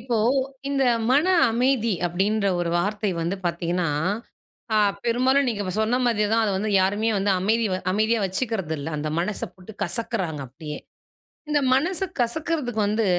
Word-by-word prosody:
இப்போ 235 0 -1 0.5
இந்த 275 -1 +1 0.3
மன 290 +6 +4 0.2
அமைதி 235 -1 +1 0.2
அப்டீன்ற 200 +4 0
ஒரு 170 - -1
வார்த்தை 205 +2 -1
வந்து 170 +4 -1
பார்த்தீங்கன்னா, 170 0 -1 0.9
அ - - +4 0.3
பெரும்பாலும் 255 +4 +3
நீங்க 210 -3 -2
இப்ப 185 -2 -3
சொன்ன 235 +4 +1
மாதியே 215 -3 +2
தான் 225 0 +3
அத 210 - +1
வந்து 215 +2 -1
யாருமே 205 +4 +1
வந்து 195 +1 +1
அமைதி 220 +3 +2 0.3
அமைதியா 220 +2 +2
வச்சுக்கறது 190 -4 -2
இல்ல. 140 - -5
அந்த 155 - -2
மனச 200 +4 -1
போட்டு 190 +4 -12
கசக்குறாங்க 180 - -2
அப்டியே. 150 +4 -8 0.7
இந்த 295 -1 +3
மனச 330 +6 +1 0.2
கசக்குறதுக்கு 245 -2 -1
வந்து, 215 +1 +1
215 Hz, 150 wpm, -24 LUFS, 185-240 Hz, 0.9 s, மன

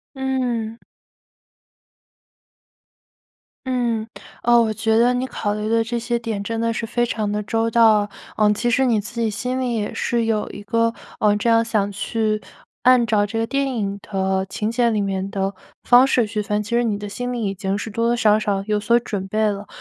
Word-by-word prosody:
嗯。 245 -4 -2 2.9
嗯， 235 -4 -1 0.4
呃， 240 0 +5
我 220 -1 +1
觉 220 +1 +1
得 240 +2 +4
你 250 +1 -1
考 205 -4 -2
虑 210 0 -3
的 225 0 +2
这 235 +1 -3
些 235 +1 -1
点 225 -3 -4
真 225 +1 -3
的 230 0 +1
是 230 - -3
非 240 +1 0
常 215 -3 -2
的 210 0 -2
周 225 +2 0
到。 220 -3 +4 0.3
呃， 210 -1 +4
其 240 +3 -1
实 265 +3 +3
你 225 -4 +2
自 235 +3 -7
己 225 -1 +1
心 250 +5 -3
里 245 -2 -1
也 210 -2 -2
是 235 -1 0
有 220 -2 0
一 205 - -9
个， 230 +2 +1 0.3
呃， 210 -1 +3
这 210 +3 0
样 230 0 +4
想 210 -3 0
去 215 +1 -1 0.4
按 250 -2 +5
照 215 -2 +2
这 225 +2 -5
个 225 - +1
电 275 +1 -1
影 200 -2 -2
的 190 -1 -1
情 215 +3 -2
节 235 0 +2
里 215 -2 0
面 195 0 -2
的 195 -1 -2 0.3
方 250 +2 +6
式 250 -3 +2
去 210 0 -3
分 210 0 -1
其 205 - -10
实 240 0 +2
你 210 -3 0
的 205 0 -6
心 245 +4 -4
里 235 -2 -3
已 195 - -1
经 195 0 -2
是 220 - -5
多 230 +3 0
多 240 - +2
少 215 -2 +4
少 200 -2 -1
有 210 -1 0
所 235 +3 +3
准 200 -5 -4
备 215 +2 +1
了。 205 0 -3
225 Hz, 220 characters per minute, -21 LUFS, 205-235 Hz, 2.9 s, 方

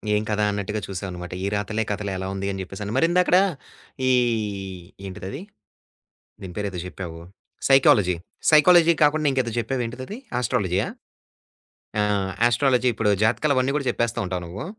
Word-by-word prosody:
ఏం 105 - +1
కథ 105 0 0
అన్నట్టుగా 105 +1 -3
చూసాం 95 0 -5
అన్నమాట. 90 0 -7
'ఈ - - -1
రాతలే' 110 +2 -1
కథలే 100 -1 -3
ఎలా 95 0 -4
ఉంది 100 0 -3
అని 95 - -5
జెప్పేసని. 100 +2 -6
మరి 165 - +4
ఇందాకడ 180 0 +4 0.7
ఈ, - - +5 1.0
ఏంటిదది. 95 - -7 1.0
దీని 90 -2 -8
పేరు 100 -1 -2
ఏదో 90 - -7
జెప్పావు 85 -3 -7 0.5
సైకాలజీ. 105 -9 +5 0.4
సైకాలజీ 170 +2 +7
కాకుండా 150 +1 +3
ఇంకేదో 130 -3 0
జెప్పావు 120 +2 -1
ఏంటిది? 125 +3 -7
అది 215 - -6 0.2
ఆస్ట్రాలజీయా? 95 -6 0 1.1
ఆ! - - +3 0.5
ఆస్ట్రాలజీ 125 0 +2
ఇప్పుడు 105 -1 +1
జాతకాలు 140 +6 +2
అవన్నీ 130 +1 +2
కూడా 140 -3 -2
జెప్పేస్తా 120 -1 -1
ఉంటావ 90 0 -2
నువ్వు? 95 - -7
110 Hz, 150 wpm, -24 LUFS, 95-135 Hz, 1.1 s, సైకాలజీ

